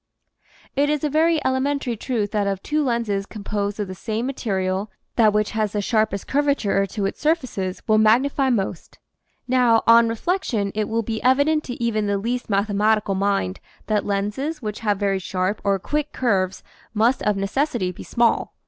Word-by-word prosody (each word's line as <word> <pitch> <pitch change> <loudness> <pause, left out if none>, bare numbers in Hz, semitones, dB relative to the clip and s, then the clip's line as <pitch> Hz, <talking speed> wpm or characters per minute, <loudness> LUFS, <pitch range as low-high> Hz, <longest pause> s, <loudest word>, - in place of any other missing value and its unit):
It 285 +1 +2
is 300 -1 0
a 300 - 0
very 320 +2 +3
elementary 260 -1 0
truth 215 -3 -2
that 205 -2 0
of 195 -1 -2
two 305 0 0
lenses 230 -6 -1
composed 205 -1 -4
of 205 - -2
the 185 - -6
same 220 +5 -3
material 195 -6 -2 0.3
that 220 -3 +5
which 210 0 0
has 215 -2 -1
the 210 - 0
sharpest 215 -3 0
curvature 275 -9 +1
to 200 +1 -3
its 195 - -4
surfaces 255 - -1
will 215 -1 +4
magnify 260 +5 +3
most. 195 -7 -2 0.5
Now, 245 -3 +3
on 230 0 +6
reflection 230 - -1
it 215 0 -2
will 230 +1 0
be 220 0 -3
evident 285 +5 +3
to 245 - -5
even 215 -3 -1
the 200 0 +1
least 240 +5 -3
mathematical 205 +1 +1
mind 195 - 0 0.3
that 215 -1 0
lenses 210 +11 -2
which 210 -5 -5
have 210 -3 0
very 195 -1 0
sharp 185 +2 -2
or 200 -1 +2
'"quick" 295 +10 -2
curves 195 -7 0 0.3
must 230 +5 +2
of 210 -1 +1
necessity 205 0 -1
be 180 - -11
small. 235 -1 +1
215 Hz, 175 wpm, -22 LUFS, 200-255 Hz, 0.5 s, on